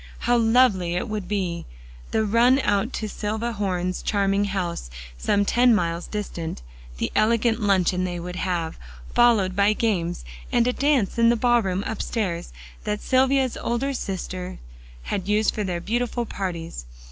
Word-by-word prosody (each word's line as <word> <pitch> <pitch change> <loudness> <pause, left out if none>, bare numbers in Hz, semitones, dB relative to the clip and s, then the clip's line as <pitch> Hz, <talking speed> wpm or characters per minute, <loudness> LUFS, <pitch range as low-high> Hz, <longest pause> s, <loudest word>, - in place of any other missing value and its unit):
How 245 - +2
lovely 225 -7 +3
it 180 - -1
would 210 -4 -4
be! 180 -5 -2 0.4
the 220 - +1
run 235 +5 +4
out 205 +3 +1
to 215 - -3
Silvia 220 +3 -3
Horne's 185 -4 -2
charming 200 0 +1
house 180 - -3 0.3
some 200 - +1
ten 240 +2 +4
miles 170 -3 -1
distant; 170 - -5 0.3
the - - -2
elegant 230 +1 +2
luncheon 185 -3 +2
they 175 -1 -3
would 180 +1 -6
have, 175 -3 -2 0.3
followed 215 -6 +4
by 200 +2 +4
games, 180 - -1 0.3
and 235 -1 +3
a 250 - +1
dance 270 -8 +1
in 230 0 +6
the 235 - +4
ball 240 0 +3
room 190 -1 -1
upstairs, 195 -5 -3 0.3
that 210 -1 -2
Silvia's 265 -1 +2
older 250 +4 -1
sisters 185 -5 -4 0.7
used 210 +3 +2
for 210 - -2
their 180 -3 -2
beautiful 240 +5 -1
parties. 170 - -5
205 Hz, 150 wpm, -24 LUFS, 180-235 Hz, 0.7 s, in